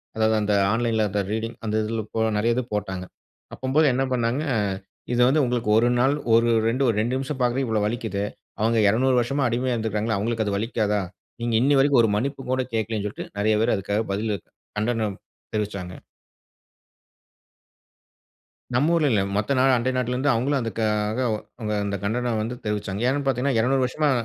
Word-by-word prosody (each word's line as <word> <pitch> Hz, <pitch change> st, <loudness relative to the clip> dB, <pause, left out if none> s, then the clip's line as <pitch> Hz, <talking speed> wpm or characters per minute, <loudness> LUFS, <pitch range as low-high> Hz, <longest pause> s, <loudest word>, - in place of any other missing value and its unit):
அதாவது 110 Hz, 0 st, +2 dB
அந்த 105 Hz, 0 st, +1 dB, 0.2 s
ஆன்லைன்ல 115 Hz, -1 st, +1 dB
அந்த 105 Hz, -, 0 dB
ரீடிங் 115 Hz, +1 st, -3 dB
அந்த 110 Hz, 0 st, -1 dB
இதில 110 Hz, +1 st, -2 dB
போன 110 Hz, 0 st, +1 dB
நெறைய 115 Hz, +2 st, +2 dB
இது 125 Hz, -, 0 dB
போட்டாங்க. 95 Hz, -3 st, -3 dB, 0.5 s
அப்பம்போது 140 Hz, +4 st, +2 dB
என்ன 135 Hz, -, +1 dB
பண்னாங்க. 120 Hz, +3 st, 0 dB, 0.7 s
இது 120 Hz, -, +2 dB
வந்து 145 Hz, +3 st, +3 dB
உங்களுக்கு 120 Hz, -3 st, -1 dB
1 120 Hz, +2 st, +4 dB
நாள் 135 Hz, +3 st, +3 dB, 0.2 s
ஒரு 115 Hz, +1 st, +4 dB, 0.2 s
2 125 Hz, +4 st, +1 dB
ஒரு 115 Hz, -, +1 dB
2 120 Hz, +4 st, -1 dB
நிமிஷம் 135 Hz, +1 st, -4 dB
பார்க்கவே 125 Hz, +2 st, +1 dB
இவ்வளோ 110 Hz, -2 st, 0 dB
வலிக்கிதே. 110 Hz, -3 st, -2 dB, 0.4 s
அவங்க 115 Hz, +1 st, +2 dB
200 125 Hz, +4 st, +2 dB
வருஷமா 135 Hz, +3 st, 0 dB
அடிமையா 125 Hz, +2 st, 0 dB
இருந்திருக்கிறாங்களே! 110 Hz, -1 st, -1 dB
அவங்களுக்கு 110 Hz, +2 st, -1 dB
அது 100 Hz, -, 0 dB
வலிக்காதா? 105 Hz, -1 st, 0 dB, 0.4 s
நீங்க 120 Hz, -1 st, 0 dB
இன்னி 140 Hz, +2 st, +4 dB
வரைக்கும் 135 Hz, -2 st, +5 dB
ஒரு 110 Hz, -, +3 dB
மன்னிப்பு 135 Hz, +5 st, -2 dB
கூட 130 Hz, 0 st, +1 dB
கேட்கல்லன்னு 110 Hz, -2 st, -1 dB
சொல்லிட்டு 105 Hz, -, -7 dB
நெறைய 110 Hz, +1 st, +3 dB
பேர் 115 Hz, -, +2 dB
அதுக்காக 100 Hz, +2 st, -1 dB
பதில் 105 Hz, +1 st, -1 dB, 0.4 s
கண்டனம் 110 Hz, -2 st, -1 dB, 0.4 s
தெரிவிச்சாங்க. 100 Hz, -4 st, -4 dB, 2.7 s
நம்ப 140 Hz, +6 st, +3 dB
ஊருல 155 Hz, -4 st, +3 dB
இல்ல. 100 Hz, -3 st, +3 dB
மத்த 105 Hz, +7 st, 0 dB
நாடு 130 Hz, 0 st, +4 dB
அண்டை 125 Hz, +2 st, 0 dB
நாட்டுல 125 Hz, 0 st, 0 dB
இருந்து 135 Hz, +3 st, +1 dB
அவுங்களும் 135 Hz, +5 st, +1 dB
அதுக்காக 110 Hz, 0 st, -1 dB
வ 110 Hz, -, 0 dB, 0.5 s
அந்த 100 Hz, 0 st, -2 dB
கண்டனம் 120 Hz, +2 st, 0 dB
வந்து 120 Hz, +3 st, -4 dB
தெரிவிச்சாங்க. 105 Hz, +1 st, -2 dB
ஏன்னு 140 Hz, +1 st, -1 dB
பாத்தீங்கன்னா 130 Hz, 0 st, +1 dB
200 130 Hz, +3 st, +2 dB
வருஷமா 150 Hz, +3 st, +1 dB
115 Hz, 170 wpm, -24 LUFS, 105-130 Hz, 2.7 s, வரைக்கும்